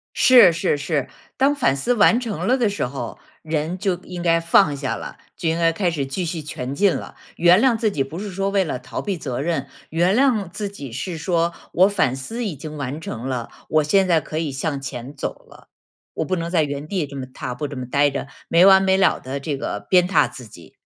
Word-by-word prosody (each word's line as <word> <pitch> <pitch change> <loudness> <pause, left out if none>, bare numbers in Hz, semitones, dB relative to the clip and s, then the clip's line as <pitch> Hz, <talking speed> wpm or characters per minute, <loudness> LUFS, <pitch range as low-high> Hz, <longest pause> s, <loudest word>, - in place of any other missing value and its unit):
是， 245 -8 +7
是， 165 -2 0
是， 145 -2 -1 0.3
当 275 +2 +3
反 135 - +2
思 190 - 0
完 230 +2 +5
成 225 -4 -4
了 260 +2 +3
的 235 -4 +2
时 200 - -2
候， 125 -2 -6 0.2
人 160 +2 -2
就 190 -1 0
应 175 -1 -7
该 165 -1 +3
放 165 -3 +4
下 135 -2 -3
了， - - -8 0.2
就 165 - -3
应 165 - 0
该 165 -1 +3
开 175 0 0
始 145 -4 -2
继 155 +7 -3
续 165 -1 -3
前 140 -3 -5
进 195 +3 +3
了。 - - -7 0.2
原 175 +5 +5
谅 255 -3 +3
自 220 -1 +1
己 140 -7 0
不 145 +5 -8
是 205 -1 -5
说 195 +2 -1
为 195 -1 +2
了 145 -7 -4
逃 125 - -6
避 200 -4 -3
责 130 -6 -4
任， 145 -3 -1 0.2
原 175 +5 +2
谅 230 -9 +2
自 205 +3 -4
己 140 -10 -9
是 165 +8 -4
说 170 +1 0 0.2
我 185 +3 +5
反 185 -11 +1
思 225 - -5
已 190 -8 -3
经 155 +2 -8
完 145 +1 -4
成 125 -5 -6
了， 125 -3 -3 0.2
我 155 -1 +3
现 190 +5 +3
在 165 -2 +4
可 155 - -6
以 160 -3 -2
向 135 +1 -3
前 130 0 -7
走 140 - -5
了。 - - -18 0.5
我 - - -1
不 185 - -1
能 170 -1 -3
在 170 -3 +2
原 145 0 -4
地 180 -5 -1
这 140 - -10
么 135 -2 -5
踏 125 -1 -6
步 145 +3 -3
这 140 - -8
么 125 - -4
待 145 +3 +2
着， 140 0 -4 0.2
没 170 +2 +6
完 195 0 +7
没 190 0 +3
了 195 - +3
地 135 +2 -5
这 140 +1 -3
个 145 - -3
鞭 180 -1 +5
挞 195 - +3
自 125 - -11
己。 85 -5 -15
165 Hz, 260 characters per minute, -22 LUFS, 140-190 Hz, 0.5 s, 是